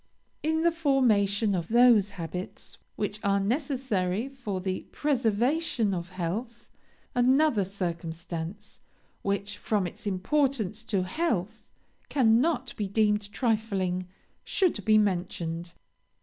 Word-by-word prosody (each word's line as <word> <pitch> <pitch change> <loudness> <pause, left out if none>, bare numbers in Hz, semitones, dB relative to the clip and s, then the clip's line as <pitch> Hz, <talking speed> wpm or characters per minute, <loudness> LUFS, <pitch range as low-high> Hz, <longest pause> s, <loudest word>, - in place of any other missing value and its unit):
"In 320 +1 +1
the 340 - +4
formation 225 - +2
of 170 -3 -1
those 235 -3 +5
habits 175 +2 -6 0.2
which 205 0 -3
are 200 0 +3
necessary 235 - -1
for 230 -8 -4
the 185 0 -3
preservation 245 -2 +1
of 175 -1 -4
health, 195 +7 -5 0.4
another 255 -2 +4
circumstance, 170 +1 -5 0.4
which, 200 +1 -2
from 210 -4 0
its 175 - -6
importance 220 +1 0
to 195 -5 0
health, 220 - -1 0.5
cannot 255 +1 +2
be 205 - -1
deemed 210 0 +1
trifling 200 -6 0 0.4
should 350 - +1
be 215 0 +6
mentioned. 175 -4 -1
210 Hz, 105 wpm, -28 LUFS, 185-250 Hz, 0.5 s, be